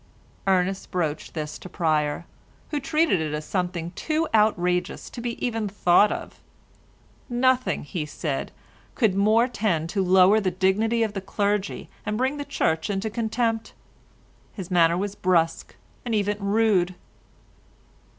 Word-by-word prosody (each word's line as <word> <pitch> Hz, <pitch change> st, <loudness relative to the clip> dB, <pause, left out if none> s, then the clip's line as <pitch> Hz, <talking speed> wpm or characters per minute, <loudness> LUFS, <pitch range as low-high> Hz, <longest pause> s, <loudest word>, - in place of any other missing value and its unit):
Ernest 190 Hz, 0 st, +1 dB
broached 160 Hz, -4 st, -3 dB
this 150 Hz, -1 st, -4 dB
to 185 Hz, -, -10 dB
Pryer, 155 Hz, -2 st, 0 dB, 0.5 s
who 295 Hz, -, 0 dB
treated 305 Hz, -, +2 dB
it 150 Hz, -1 st, -2 dB
as 150 Hz, 0 st, -5 dB
something 175 Hz, -3 st, -2 dB
too 315 Hz, -, -1 dB
outrageous 180 Hz, -5 st, +1 dB
to 240 Hz, -, -7 dB
be 235 Hz, 0 st, -2 dB
even 225 Hz, -4 st, -1 dB
thought 195 Hz, +1 st, +4 dB
of. -, -, -6 dB, 0.9 s
Nothing, 255 Hz, +1 st, +1 dB
he 150 Hz, +1 st, -4 dB
said, 145 Hz, -2 st, -3 dB, 0.4 s
could 220 Hz, -7 st, +2 dB
more 215 Hz, +5 st, +3 dB
tend 185 Hz, -9 st, -1 dB
to 195 Hz, +1 st, 0 dB
lower 190 Hz, +3 st, +5 dB
the 195 Hz, -3 st, 0 dB
dignity 205 Hz, +6 st, +1 dB
of 215 Hz, -2 st, -2 dB
the 195 Hz, -, -4 dB
clergy 205 Hz, +1 st, -1 dB, 0.2 s
and 210 Hz, 0 st, -2 dB
bring 260 Hz, +4 st, 0 dB
the 285 Hz, -, -4 dB
Church 160 Hz, -, 0 dB
into 205 Hz, +2 st, -2 dB
contempt. 225 Hz, 0 st, -1 dB, 0.8 s
His 190 Hz, -3 st, -8 dB
manner 170 Hz, -1 st, +4 dB
was 200 Hz, +1 st, -2 dB
brusque, 175 Hz, -4 st, 0 dB, 0.3 s
and 235 Hz, -3 st, -1 dB
even 205 Hz, 0 st, 0 dB
rude. 200 Hz, -3 st, +2 dB
200 Hz, 140 wpm, -25 LUFS, 175-225 Hz, 0.9 s, lower